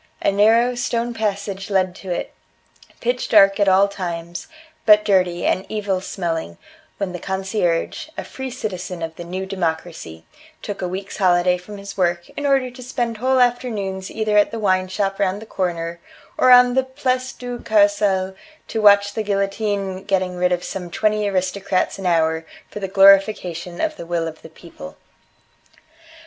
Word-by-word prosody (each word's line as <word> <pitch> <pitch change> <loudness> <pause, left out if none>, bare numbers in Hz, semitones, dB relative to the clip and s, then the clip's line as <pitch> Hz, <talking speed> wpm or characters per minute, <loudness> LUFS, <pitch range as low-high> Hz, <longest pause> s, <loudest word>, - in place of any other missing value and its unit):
A - - +3
narrow 225 +5 +4
stone 240 -1 -2
passage 200 -3 -3
led 185 -2 +1
to 190 - -10
it 175 - -3 0.7
pitch 245 +1 -1
dark 195 -2 +6
at 205 - +3
all 190 +1 +5
times, 175 -3 -6 0.4
but 210 -1 +6
dirty, 180 -4 +2
and 185 - +1
evil 200 -3 -1
smelling 165 - -4 0.4
when 195 -2 -3
the 180 - -6
concierge 190 - -2
a - - -3
free 265 0 -7
citizen 185 -8 -5
of 160 0 -5
the 175 - -7
new 185 +2 -5
democracy 165 - -4 0.4
took 205 -1 -5
a 180 - -1
week's 190 +2 -6
holiday 180 -2 +3
from 185 +3 -10
his 200 0 -9
work 175 -2 0
in 285 - -3
order 270 -2 +2
to 255 +1 -12
spend 240 -2 -3
whole 260 +3 +2
afternoons 215 -6 0
either 215 -1 0
at 205 - +3
the 230 - -5
wineshop 195 -1 0
round 195 0 0
the 220 - -10
corner, 170 -4 -3 0.4
or 255 - +3
on 250 0 +7
the 265 +1 +2
Place 260 -1 -2
du 245 -1 -7
Carrousel 205 -3 +2 0.4
to 220 - -2
watch 205 -1 +5
the 220 - -2
guillotine 200 -1 -2
getting 185 -2 0
rid 180 0 +1
of 180 0 0
some 180 -2 -6
twenty 210 +3 0
aristocrats 185 0 -1
an 190 - -2
hour 160 -1 +2 0.3
for - - -6
the 195 - -3
glorification 195 -3 +3
of 315 -1 -1
the 170 - -8
will 170 -1 -1
of 160 0 -9
the - - -12
people. 160 - -12
195 Hz, 170 wpm, -21 LUFS, 180-215 Hz, 0.7 s, on